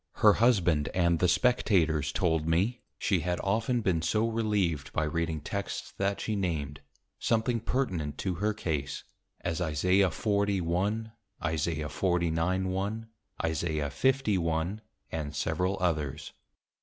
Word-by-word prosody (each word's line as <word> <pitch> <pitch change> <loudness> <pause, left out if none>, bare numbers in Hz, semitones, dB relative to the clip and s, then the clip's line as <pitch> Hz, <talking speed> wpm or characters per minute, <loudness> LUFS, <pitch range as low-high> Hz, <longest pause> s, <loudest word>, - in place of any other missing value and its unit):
Her 105 -1 +6
Husband 90 -11 +3
and 85 -2 +3
the 90 - +3
Spectators 85 - +2
told 80 -3 +1
me, 95 +9 +1 0.2
she 95 -5 +1
had 90 +1 -1
often 115 +4 +1
been 90 -6 +1
so 110 +7 +1
relieved 105 -10 0
by 75 - +1
reading 80 0 -1
Texts 100 +6 -4
that 100 0 0
she 110 - -2
named, 80 -8 -2 0.4
something 115 +1 +1
pertinent 90 - -2
to 95 - -1
her 105 +1 +2
Case; 75 -9 -3 0.4
as 85 0 -2
Isa. 90 +4 +3
40.1. 100 +2 0 0.3
Isa. 80 0 -1
49.1. 95 +6 0 0.4
Isa. 80 +1 -1 0.2
50.1. 95 - +1 0.3
and 75 -2 -4
several 95 +2 0
others. 75 -7 -1
90 Hz, 120 wpm, -29 LUFS, 80-105 Hz, 0.4 s, Her